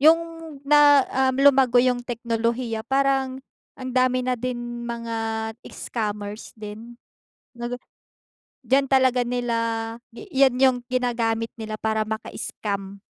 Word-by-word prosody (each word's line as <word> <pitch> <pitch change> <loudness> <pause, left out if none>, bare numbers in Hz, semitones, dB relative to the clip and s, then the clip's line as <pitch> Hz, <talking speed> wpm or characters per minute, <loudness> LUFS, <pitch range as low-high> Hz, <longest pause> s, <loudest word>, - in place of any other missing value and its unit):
yung 315 +3 +8 0.5
na 290 -1 +6 0.2
um, 260 - +1
lumago 270 -3 +5
yung 245 0 +4
teknolohiya, 235 -1 -2
parang 270 -1 +1 0.4
ang 255 -1 -6
dami 255 0 +2
na 255 - +1
din 240 -1 -4
mga 225 -1 -3 0.2
scammers 210 -1 -5
din, 220 +2 -9 0.6
nag 240 +1 -5
ah - - -55 0.9
diyan 270 +2 +4
talaga 260 -2 +4
nila 245 -1 -1 0.6
yan 270 - +1
yung 260 -2 +5
ginagamit 230 -3 0
nila 220 -1 -6
para 220 0 0
maka-scam. 200 -2 -5
240 Hz, 115 wpm, -24 LUFS, 225-260 Hz, 0.9 s, yung